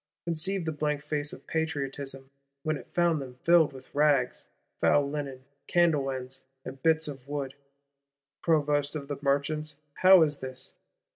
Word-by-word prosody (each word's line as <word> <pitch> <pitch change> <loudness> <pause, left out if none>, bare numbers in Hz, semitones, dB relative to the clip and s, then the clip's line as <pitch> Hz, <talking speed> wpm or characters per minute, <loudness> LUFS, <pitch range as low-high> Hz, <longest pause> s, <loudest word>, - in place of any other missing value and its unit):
—Conceive 170 +2 -1
the 160 - 0
blank 150 -1 -1
face 150 -1 -2
of - - -11
Patriotism, 140 -4 -3 0.3
when 155 0 0
it 140 - -10
found 170 -3 +2
them 130 -2 -8
filled 170 -3 +5
with 130 -1 -13
rags, 145 -4 +2 0.3
foul 145 -1 +4
linen, 140 -3 -5 0.2
candle 160 -6 +3
ends, 130 0 -6 0.2
and 130 +1 -8
bits 160 0 +3
of 135 -3 -8
wood! 140 -2 -3 0.9
Provost 145 -2 +2
of 140 -2 -5
the 145 - -3
Merchants, 145 +2 0 0.2
how 185 -2 +8
is 150 -2 0
this? 130 0 -6
145 Hz, 150 wpm, -29 LUFS, 135-160 Hz, 0.9 s, how